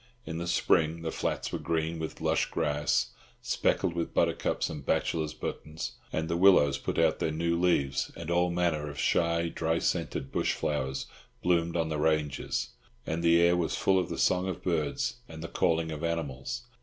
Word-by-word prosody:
In 80 +1 -4
the 85 - -3
spring 85 -1 +2
the 80 - -2
flats - - -2
were - - -2
green 80 0 -1
with 80 -1 -5
lush - - +2
grass, 75 -2 0 0.3
speckled 85 - +1
with 85 -1 -3
buttercups - - +1
and 75 -3 -6
bachelors' 80 +2 0
buttons, 75 +1 -5 0.2
and 80 +1 -1
the 85 - -1
willows 85 -6 +5
put - - -3
out - - +3
their - - 0
new 85 +2 0
leaves, 80 -6 +1
and 85 0 -5
all 90 +1 +3
manner 85 -4 0
of 70 - -9
shy 85 0 +2
dry 80 0 0
scented 65 -4 -1
bush - - +1
flowers 65 -2 -2 0.4
bloomed 85 -1 +2
on 80 -1 0
the 75 -1 -2
ranges; 75 -3 0 0.4
and 80 +1 -2
the 85 0 +5
air 85 +1 +5
was 85 -2 0
full 95 -1 +3
of 90 - -2
the - - -4
song 90 +1 +2
of 95 - -4
birds 120 - -1
and 80 0 -8
the - - -4
calling 80 -1 +1
of 80 +1 -5
animals. 85 - -3
80 Hz, 185 wpm, -29 LUFS, 75-85 Hz, 0.4 s, willows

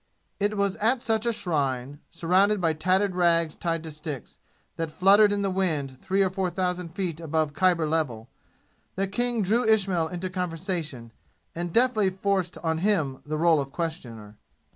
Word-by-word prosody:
It 205 +1 0
was 200 0 0
at 230 +5 +2
such 225 -1 -1
a - - +3
shrine, 140 - -2
surrounded 190 +5 +2
by 165 -3 +1
tattered 185 +5 +1
rags 170 -3 +2
tied 165 -2 -2
to 160 - -7
sticks, 150 -4 -7 0.4
that 165 -1 -3
fluttered 200 +6 +5
in 200 0 0
the 195 - 0
wind 150 -9 -1
three 195 +1 +1
or 190 - 0
four 190 -1 -1
thousand 180 -1 -3
feet 180 -5 -2
above 160 -2 -1
Khyber 170 -1 +2
level, 135 -8 -1 0.7
that 195 0 -2
King 240 -1 0
drew 225 +6 +2
Ismail 195 -7 +2
into 180 +2 -5
conversation, 165 - -4 0.4
and 175 0 -4
deftly 230 -2 +3
forced 190 -1 -1
on 160 -1 0
him 160 -9 0
the 155 +1 -2
role 160 -2 +4
of 135 0 -7
questioner. 120 -12 -6
175 Hz, 165 wpm, -26 LUFS, 155-195 Hz, 0.7 s, fluttered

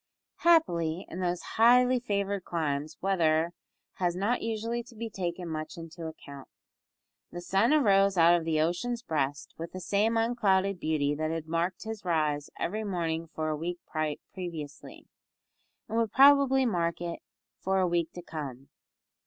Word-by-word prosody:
Happily, 175 - +2
in 180 - -6
those 180 -1 -1 0.2
highly 250 +2 +6
favoured 200 -4 -2
climes 150 -3 -2
weather 170 -3 +2 0.4
has 175 -2 0
not 205 +7 0
usually 230 +1 -2
to 235 0 -15
be 225 0 -5
taken 175 -2 -4
much 155 +2 -5
into 165 0 -7
account. 140 -3 -10 0.8
The 175 - -6
sun 195 +7 +2
arose 200 -9 +4
out 170 +1 +7
of 170 - 0
the 160 -1 0
ocean's 230 +9 -1
breast 145 -3 -2
with 165 +1 -6
the 185 - -5
same 210 +5 +1
unclouded 200 -5 +2
beauty 150 -3 0
that 155 +1 -2
had 165 -1 -3
marked 170 +3 -2
his 220 -1 -6
rise 155 -4 0
every 215 +4 -2
morning 165 -4 -2
for 155 -1 -3
a 155 - 0
week 170 +3 -4 0.6
previously, 160 -6 -7 0.8
and 225 +1 -1
would 225 -2 0
probably 275 -1 +6
mark 170 -6 0
it 170 -1 -4 0.4
for 190 0 0
a 185 - +3
week 170 -1 0
to 175 - -8
come. 140 -5 -7
175 Hz, 155 wpm, -29 LUFS, 160-215 Hz, 0.8 s, out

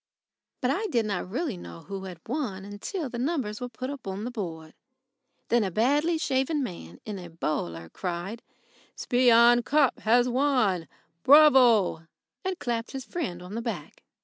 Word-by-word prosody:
But 255 0 +2
I 410 +9 -1
did 235 - +1
not 195 -3 -3
really 255 - -2
know 85 - -10
who 195 -1 -7
had 180 -3 -8
won 205 -7 -4
till 345 - -3
the 240 -1 -6
numbers 250 -6 -2
were 250 - -4
put 255 +3 -5
up 280 -7 -8
on 195 +2 -4
the 245 - -4
board. 165 -8 -6 0.8
Then 235 -1 +3
a 195 - -1
badly 290 - +2
shaven 285 0 0
man 90 - -8
in 205 -2 -5
a 175 -1 -9
bowler 85 - -3
cried: 180 - -5 0.5
"Spion 240 -1 +5
Kop 285 0 +2
has 240 +3 +3
won! 245 - +1 0.3
Bravo!" 250 - +6 0.4
and 375 -1 -2
clapped 235 -3 -3
his 265 -1 -5
friend 180 - -4
on 180 +3 -9
the 230 - -3
back. 210 -11 -6
235 Hz, 165 wpm, -27 LUFS, 190-265 Hz, 0.8 s, Bravo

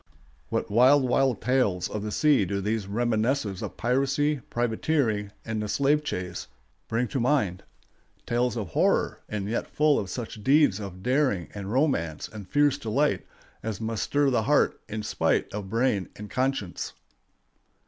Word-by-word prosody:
What - - -2
wild, 130 +6 +6
wild 130 0 +1
tales 105 -8 +1
of 105 - -4
the 105 0 -4
sea 150 -3 +3
do 100 +2 -2
these 105 0 -2
reminiscences 110 -1 0
of - - -6
piracy, 135 +4 +1
privateering, 115 -3 0
and 110 -1 -2
the 105 - -3
slave 140 +6 +2
chase 90 -8 -4 0.4
bring 120 +2 0
to 135 - -2
mind—tales 120 0 -2
of 105 - -3
horror, - - +1
and 105 -2 -3
yet 115 +3 -2
full 150 -1 +3
of 100 - -4
such 110 -2 -6
deeds 140 -7 +4
of 95 -3 -8
daring 130 - +1
and 100 -1 -6
romance 115 - 0
and 105 -4 -10
fierce 145 -1 +3
delight 135 +7 0 0.3
as 110 -3 -4
must 110 -1 -2
stir 145 -1 +2
the 120 - +2
heart 145 +7 +2
in 105 0 -4
spite - - 0
of 100 -2 -5
brain 115 -3 +1
and 105 0 -9
conscience! 130 -8 -2
115 Hz, 155 wpm, -27 LUFS, 105-135 Hz, 0.4 s, wild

